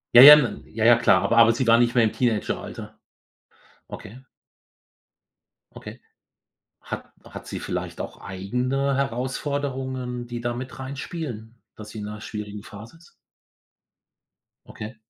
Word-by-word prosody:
Ja, 120 Hz, -, +11 dB
ja, 150 Hz, +2 st, +13 dB
n 135 Hz, -6 st, -1 dB
ja, 110 Hz, 0 st, 0 dB
ja, 120 Hz, 0 st, +8 dB
klar, 100 Hz, -5 st, +3 dB
aber 115 Hz, +4 st, +1 dB
aber 115 Hz, 0 st, +7 dB
sie 125 Hz, +2 st, -1 dB
war 115 Hz, +1 st, +5 dB
nicht 120 Hz, 0 st, +2 dB
mehr 120 Hz, -, +5 dB
im 110 Hz, -, +2 dB
Teenageralter. 115 Hz, -4 st, -3 dB, 0.9 s
Okay. 130 Hz, +6 st, -11 dB, 1.5 s
Okay. -, -, -11 dB, 0.8 s
Hat -, -, -7 dB
hat -, -, -11 dB
sie -, -, -5 dB
vielleicht -, -, -5 dB
auch -, -, -8 dB
eigene 125 Hz, +9 st, -2 dB
Herausforderungen, 130 Hz, -1 st, -3 dB
die 120 Hz, 0 st, -6 dB
da 120 Hz, 0 st, -2 dB
mit 130 Hz, +2 st, -8 dB
reinspielen, 130 Hz, -4 st, -7 dB
dass 105 Hz, 0 st, -10 dB
sie 110 Hz, -, -8 dB
in 105 Hz, -, -6 dB
'ner 105 Hz, 0 st, -8 dB
schwierigen 105 Hz, -1 st, -7 dB
Phase 110 Hz, +7 st, -12 dB
ist? 170 Hz, +1 st, -21 dB, 1.6 s
Okay. 110 Hz, +3 st, -8 dB
120 Hz, 140 wpm, -24 LUFS, 110-130 Hz, 1.6 s, ja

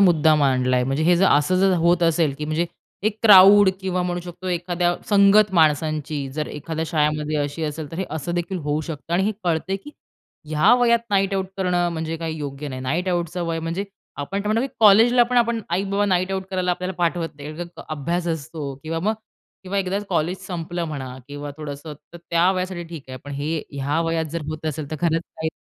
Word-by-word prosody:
मुद्दा 160 Hz, -5 st, +5 dB
मांडलाय. 130 Hz, -3 st, +2 dB
म्हणजे 135 Hz, +4 st, -1 dB
हे 175 Hz, +1 st, +5 dB
जर 195 Hz, +2 st, +4 dB
असं 150 Hz, +6 st, +3 dB
जर 195 Hz, -1 st, +4 dB
होत 175 Hz, 0 st, +4 dB
असेल 160 Hz, -4 st, +2 dB
की 150 Hz, -, -3 dB
म्हणजे 155 Hz, +3 st, 0 dB, 0.4 s
एक 215 Hz, 0 st, -9 dB
क्राउड 200 Hz, -1 st, +8 dB
किंवा 185 Hz, -1 st, -1 dB
म्हणू 175 Hz, 0 st, -2 dB
शकतो 175 Hz, +1 st, -8 dB
एखाद्या 175 Hz, 0 st, 0 dB
संगत 200 Hz, 0 st, +5 dB
माणसांची 155 Hz, -2 st, +1 dB
जर 150 Hz, +1 st, -3 dB
एखाद्या 160 Hz, +2 st, -4 dB
शाळेमध्ये 150 Hz, -1 st, 0 dB
अशी 145 Hz, +2 st, -2 dB
असेल, 150 Hz, -1 st, -5 dB
तर 165 Hz, -, -7 dB
हे 190 Hz, -, -1 dB
असं 160 Hz, +3 st, -3 dB
देखील 175 Hz, +2 st, -2 dB
होऊ 150 Hz, +1 st, 0 dB
शकतं. 160 Hz, +1 st, -7 dB
आणि 185 Hz, -, +2 dB
हे 215 Hz, -, +1 dB
कळतंय 175 Hz, +3 st, 0 dB
की 295 Hz, -, -9 dB, 0.6 s
ह्या 155 Hz, +10 st, +5 dB
वयात 235 Hz, -1 st, +4 dB
नाईटआउट 195 Hz, -1 st, +1 dB
करणं 180 Hz, -2 st, +1 dB
म्हणजे 160 Hz, 0 st, -3 dB
काही 160 Hz, -1 st, -4 dB
योग्य 145 Hz, 0 st, -5 dB
नाही. 130 Hz, -1 st, -6 dB
नाईटआउटचं 175 Hz, +4 st, -1 dB
वय 165 Hz, -1 st, -1 dB
म्हणजे 165 Hz, +5 st, -3 dB, 0.3 s
आपण 170 Hz, +8 st, -3 dB
आता 210 Hz, -, -3 dB
म्हणतो, 230 Hz, +3 st, +2 dB
की 265 Hz, -, -17 dB
कॉलेजला 225 Hz, +4 st, +7 dB
पण 250 Hz, +1 st, -2 dB
आपण 235 Hz, -1 st, +2 dB
आई-बाबा 200 Hz, +3 st, 0 dB
नाईटआउट 190 Hz, +1 st, 0 dB
करायला 185 Hz, -1 st, 0 dB
आपल्याला 180 Hz, +1 st, -3 dB
पाठवत 170 Hz, -1 st, 0 dB
नाही. 145 Hz, +1 st, -7 dB
कारण 175 Hz, 0 st, -5 dB
का, -, -, -8 dB
अभ्यास 170 Hz, +4 st, -2 dB
असतो 150 Hz, -3 st, -4 dB
किंवा 165 Hz, +1 st, -3 dB
मग 215 Hz, +5 st, +1 dB, 0.5 s
किंवा 190 Hz, +2 st, -2 dB
एकदाचं 195 Hz, +2 st, -1 dB
कॉलेज 175 Hz, +1 st, 0 dB
संपलं 175 Hz, -1 st, -4 dB
म्हणा 130 Hz, -4 st, -6 dB
किंवा 145 Hz, 0 st, -6 dB
थोडंसं, 150 Hz, 0 st, -7 dB, 0.2 s
तर 170 Hz, -, -10 dB
त्या 170 Hz, +2 st, +4 dB
वयासाठी 185 Hz, -2 st, -3 dB
ठीक 165 Hz, -5 st, -8 dB
आहे. 130 Hz, -, -7 dB
पण 145 Hz, -, -7 dB
हे 150 Hz, +3 st, -2 dB
ह्या 140 Hz, +3 st, -1 dB
वयात 165 Hz, 0 st, 0 dB
जर 170 Hz, -, -3 dB
होत 155 Hz, 0 st, -5 dB
असेल 155 Hz, -1 st, -4 dB
तर 155 Hz, -, -3 dB
खरंच 165 Hz, -1 st, +1 dB
काही 160 Hz, 0 st, -2 dB
170 Hz, 200 wpm, -22 LUFS, 150-185 Hz, 0.6 s, क्राउड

